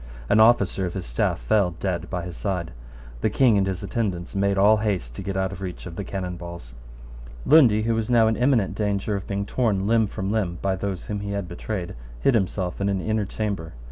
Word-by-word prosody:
An 105 - +4
officer 100 -4 +4
of 90 - -7
his 95 - -4
staff - - 0
fell 90 - +1
dead 90 -3 -2
by 90 -2 -3
his 90 0 -7
side. 90 -5 -3 0.5
The - - +1
King 125 -5 +4
and 95 -1 +2
his 95 -1 -3
attendants 95 -5 -2
made 100 0 +1
all 105 +3 +6
haste 100 - -2
to - - -7
get 95 -1 -3
out 95 0 0
of 95 -1 -8
reach 90 -2 -6
of 85 -2 -8
the 100 - -4
cannon 90 -2 -4
balls. 85 -8 -9 0.7
Lundy, 125 -9 +6
who 115 +1 +1
was 115 0 -1
now 115 -2 +5
in 110 - +2
imminent 120 -5 +2
danger 100 0 -1
of 100 - -5
being 100 0 -2
torn 105 -5 0
limb 110 0 +3
from 95 0 -3
limb 95 -6 -1
by 95 -1 0
those 95 -1 -4
whom 105 -1 -3
he 100 0 -4
had 100 -3 -3
betrayed, 90 +1 -5 0.3
hid 135 - +3
himself 95 -4 -1
in 100 - +1
an 100 -1 0
inner 110 +1 -1
chamber. 100 -6 -4
100 Hz, 225 wpm, -24 LUFS, 90-110 Hz, 0.7 s, all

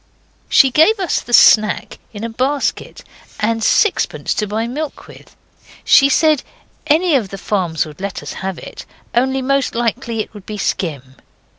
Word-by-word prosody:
She 270 - +5
gave 360 - +4
us 370 - -1
the - - -12
'snack' 215 -2 +4
in 210 0 -8
a 230 - -3
basket, 265 +5 -2 0.4
and 225 +1 -1
sixpence 425 - +1
to 210 - -2
buy 220 +3 -2
milk 285 +5 -6
with. - - -16 0.5
She 275 0 +6
said 305 0 +3 0.5
any 325 +3 +3
of 235 -8 +1
the 195 - -7
farms 180 -5 -1
would 150 +2 -12
let 200 -1 -5
us - - -7
have 190 -2 -4
it, - - -10 0.3
only 265 +2 +1
most 275 -1 0
likely 235 -1 -2
it - - -9
would 205 -3 -13
be 215 - -6
skim. 140 -10 -4
230 Hz, 165 wpm, -17 LUFS, 205-275 Hz, 0.5 s, She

